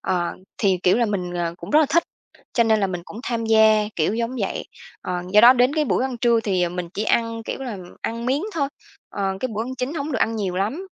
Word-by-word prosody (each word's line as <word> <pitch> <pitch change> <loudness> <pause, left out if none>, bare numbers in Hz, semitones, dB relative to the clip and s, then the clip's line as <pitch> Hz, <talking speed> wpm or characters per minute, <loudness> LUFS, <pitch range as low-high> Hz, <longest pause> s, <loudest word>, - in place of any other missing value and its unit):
Ờ, 180 -2 -1 0.3
thì, 190 -4 +2
kiểu 180 - +4
là, 235 -1 +2
mình, 185 -4 -3
ờ, 170 -1 -2
cũng - - -9
rất 300 - +6
là 310 - +3
thích, 340 +2 +3 0.5
cho 235 - +3
nên 220 -1 +3
là 195 - +2
mình 180 -2 -5
cũng 220 - -9
tham 235 -3 -2
gia 220 -1 +5
kiểu 170 +6 +1
giống 235 +2 -2
vậy. 195 - -2 0.4
Ờ, 180 -1 -3
do 210 - +7
đó 240 +3 +9
đến 255 +2 +2
cái 310 -1 +2
buổi 255 - +1
ăn 260 -2 -3
trưa 235 -1 +3
thì, 190 -5 0
ờ, 175 - +2
mình 175 0 -5
chỉ 210 - -2
ăn, 230 0 0
kiểu - - -5
là, 230 -7 -5 0.2
ăn 230 +1 -4
miếng 275 +6 +1
thôi, 285 -4 0 0.4
ờ, 195 -1 -2
cái 255 - -1
bữa 220 - -1
ăn 255 +2 -5
chính 260 +4 -3
hổng 295 -1 -3
được 230 - 0
ăn 225 +1 +1
nhiều 190 -4 -2
lắm. 245 - -2
225 Hz, 260 wpm, -22 LUFS, 195-250 Hz, 0.5 s, đó